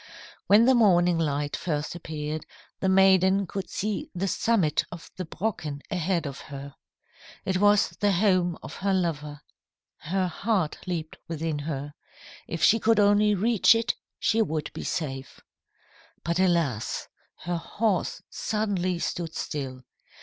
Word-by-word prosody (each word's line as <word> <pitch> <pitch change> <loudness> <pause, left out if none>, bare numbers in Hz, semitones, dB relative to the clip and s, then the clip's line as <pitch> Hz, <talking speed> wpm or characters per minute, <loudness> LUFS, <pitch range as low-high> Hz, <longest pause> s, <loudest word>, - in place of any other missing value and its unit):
"When 210 +3 +7
the 260 - +6
morning 180 -7 +4
light 145 -2 -1
first 150 -3 -2
appeared, 155 -2 -5 0.3
the 190 - +1
maiden 190 0 +5
could 195 +2 -5
see 210 0 -3
the 190 +3 -1
summit 190 -7 +2
of 175 -2 -10
the 185 - -4
Brocken 160 -6 -4
ahead 180 -2 0
of 140 -1 -5
her. 140 0 -8 0.7
It 190 -1 +1
was 205 0 +4
the 205 0 +3
home 180 -3 +2
of - - -8
her 195 0 +1
lover. 150 -5 -2 0.6
Her 185 +4 -1
heart 185 -1 -1
leaped 165 -3 -4
within 160 -2 -2
her. 145 -1 -4 0.5
If 165 0 -3
she 225 +5 +6
could 225 0 +3
only 205 +1 +4
reach 225 +2 +4
it 230 +1 +1 0.2
she 225 0 +2
would 155 -7 -2
be - - -6
safe. 135 -6 -4 0.8
"But 170 +2 -1
alas! 170 - +1 0.4
her 175 +1 -1
horse 205 +3 -1
suddenly 195 -5 -1
stood 170 -1 -3
still. 130 -4 -4
175 Hz, 140 wpm, -26 LUFS, 155-200 Hz, 0.8 s, When